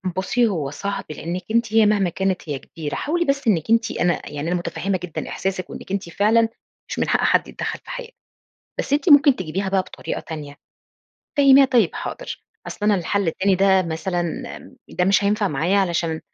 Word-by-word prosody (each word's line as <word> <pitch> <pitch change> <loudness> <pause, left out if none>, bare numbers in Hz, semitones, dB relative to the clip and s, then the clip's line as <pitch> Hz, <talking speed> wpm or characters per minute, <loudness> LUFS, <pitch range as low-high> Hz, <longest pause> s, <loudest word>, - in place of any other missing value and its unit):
بُصّي 235 +6 +1
هو 160 -10 -2
صعب 200 +6 -4
لإنِّك 170 +4 -4
أنتِ 230 -1 +1
هي 220 -1 +6
مهما 205 -3 +3
كانت 185 -1 -2
هي 140 -2 -2
كبيرة، 150 +1 -6
حاولي 345 +3 0
بس 275 -3 0
إنِّك 180 -6 +2
أنتِ 230 0 +3
أنا 175 0 -1
يعني 145 +2 -4
أنا 175 - 0
متفهمة 185 +2 -2
جدًا 175 -3 -5
إحساسِك 190 -1 -3
وإنِّك - - -9
أنتِ 195 -3 -3
فعلًا 225 +5 +3 0.4
مش - - -4
من - - 0
حق - - +3
حد - - +3
يتدخل - - -4
في - - -15
حياتِك. - - -7 0.6
بس - - -1
أنتِ 295 +5 +2
ممكن 285 -2 +7
تجيبيها 185 0 -3
بقى 190 0 +2
بطريقة - - -6
تانية، 150 -3 -8 0.8
فهميها، 275 -1 +7
"طيّب، 245 -9 +3
حاضر، - - -6 0.3
أصل - - -7
أنا 210 - +5
الحل 195 +1 0
التاني 190 +4 +1
ده 190 0 +4
مثلًا 175 +1 -2 0.7
م - - -13
ده 180 - +2
مش 195 +2 +3
هينفع 205 -1 +2
معايا 165 +8 +1
علشان 170 -4 0
195 Hz, 190 wpm, -22 LUFS, 170-225 Hz, 0.8 s, ممكن